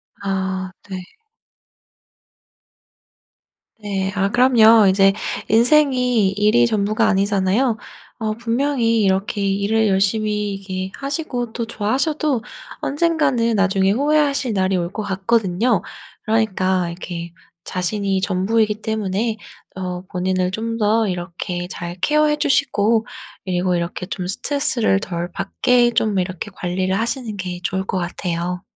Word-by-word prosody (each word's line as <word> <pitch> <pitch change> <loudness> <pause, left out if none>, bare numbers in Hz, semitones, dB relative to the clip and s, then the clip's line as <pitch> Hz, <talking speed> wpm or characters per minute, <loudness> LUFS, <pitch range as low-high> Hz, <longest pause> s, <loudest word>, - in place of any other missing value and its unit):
아 190 -1 -3 0.2
네. 190 - -4 2.8
네. 195 -2 -2
아 195 0 +1
그럼요. 230 -3 +6
이제 195 +1 +4 0.3
인생이 250 -3 +3
일이 210 +4 +3
전부가 215 -1 +1
아니잖아요. 200 +4 +1 0.4
어 215 -1 0
분명히 235 0 0
이렇게 195 +2 0
일을 200 +3 +1
열심히 210 +1 +1
이렇게 190 -1 -5
하시고 275 -5 -3
또 235 - -3
좋아하셔도 260 +4 -1 0.4
언젠가는 280 -7 +1
나중에 195 -1 +2
후회하실 280 0 +1
날이 190 -1 +1
올 175 -1 -2
것 215 +1 -4
같거든요. 205 +2 +1 0.4
그러니까 190 -5 +1
이렇게 170 0 -6 0.3
자신이 195 +1 -1
전부이기 210 +3 +1
때문에 215 +1 -1 0.4
어 180 -1 -4
본인을 185 0 -1
좀 230 +3 -3
더 220 0 +2
이렇게 175 -1 -4
잘 175 -2 -6
케어해 300 +3 +3
주시고 230 -7 +2 0.4
그리고 180 -1 0
이렇게 170 +1 -3
좀 185 -2 -4
스트레스를 235 -2 +1
덜 175 -2 -4
받게 240 +6 +2
좀 215 -3 +1
이렇게 185 +2 -4
관리를 185 +2 -1
하시는 230 -2 -3
게 180 -1 -5
좋을 190 +1 -2
것 190 - -2
같아요. 175 0 -3
205 Hz, 270 characters per minute, -20 LUFS, 190-230 Hz, 2.8 s, 그럼요